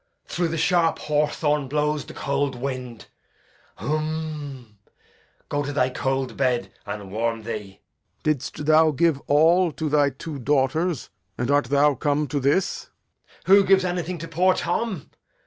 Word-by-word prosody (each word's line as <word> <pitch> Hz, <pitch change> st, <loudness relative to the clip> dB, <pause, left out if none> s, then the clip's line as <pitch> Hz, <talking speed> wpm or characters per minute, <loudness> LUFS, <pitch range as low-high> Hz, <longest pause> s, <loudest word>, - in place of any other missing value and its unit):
Through 175 Hz, -1 st, -1 dB
the 165 Hz, 0 st, -3 dB
sharp 170 Hz, 0 st, +2 dB
hawthorn 150 Hz, -1 st, 0 dB
blows 150 Hz, +1 st, 0 dB
the -, -, -11 dB
cold 140 Hz, -1 st, -1 dB
wind. 125 Hz, -3 st, -5 dB, 0.7 s
Humh! 150 Hz, -7 st, -4 dB, 0.7 s
go 145 Hz, -, -1 dB
to 145 Hz, 0 st, -3 dB
thy 130 Hz, -3 st, +1 dB
cold 135 Hz, -1 st, -2 dB
bed, 125 Hz, -3 st, 0 dB
and 100 Hz, -2 st, -6 dB
warm 115 Hz, +1 st, -1 dB
thee. 105 Hz, -4 st, -6 dB, 0.4 s
Lear. 155 Hz, -, +4 dB
Hast 145 Hz, +2 st, -7 dB
thou 155 Hz, +1 st, +5 dB
given 155 Hz, -1 st, +1 dB
all 165 Hz, +4 st, +4 dB
to 155 Hz, +1 st, -3 dB
thy 145 Hz, -1 st, +3 dB
two 140 Hz, +2 st, -7 dB
daughters, 145 Hz, +3 st, 0 dB, 0.3 s
and 120 Hz, +3 st, -1 dB
art 145 Hz, -1 st, +3 dB
thou 145 Hz, +3 st, +3 dB
come 145 Hz, +2 st, 0 dB
to 145 Hz, +1 st, -1 dB
this? 140 Hz, +8 st, 0 dB
Edg. -, -, -48 dB, 0.2 s
Who 200 Hz, +1 st, +7 dB
gives 190 Hz, -1 st, +4 dB
anything 175 Hz, 0 st, -2 dB
to 165 Hz, 0 st, -7 dB
poor 180 Hz, +3 st, +2 dB
Tom? 185 Hz, -, -2 dB
145 Hz, 150 wpm, -24 LUFS, 130-160 Hz, 0.7 s, Who